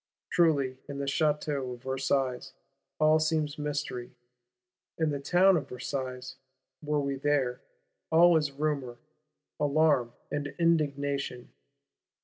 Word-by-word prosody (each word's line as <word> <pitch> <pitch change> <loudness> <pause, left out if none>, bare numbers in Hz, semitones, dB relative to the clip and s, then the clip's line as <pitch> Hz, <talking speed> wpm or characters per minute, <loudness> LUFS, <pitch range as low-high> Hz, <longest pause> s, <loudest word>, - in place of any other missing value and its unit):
Truly, 140 -7 +2
in 140 - -5
the 140 - -2
Château 145 -3 0
of 120 - -19
Versailles 135 -1 -1 0.5
all 155 0 +5
seems 155 -2 0
mystery: 145 -5 -4 0.8
in 160 -2 +1
the 140 - -2
Town 180 +6 +4
of 155 - -2
Versailles, 130 0 -5 0.4
were 150 -1 0
we 140 -1 -2
there, 135 -3 0 0.5
all 170 +1 +6
is 150 -3 +1
rumour, 140 -4 -2 0.6
alarm 145 -5 +2 0.2
and 145 -1 -3
indignation. 140 -6 0
140 Hz, 115 wpm, -29 LUFS, 130-155 Hz, 0.8 s, all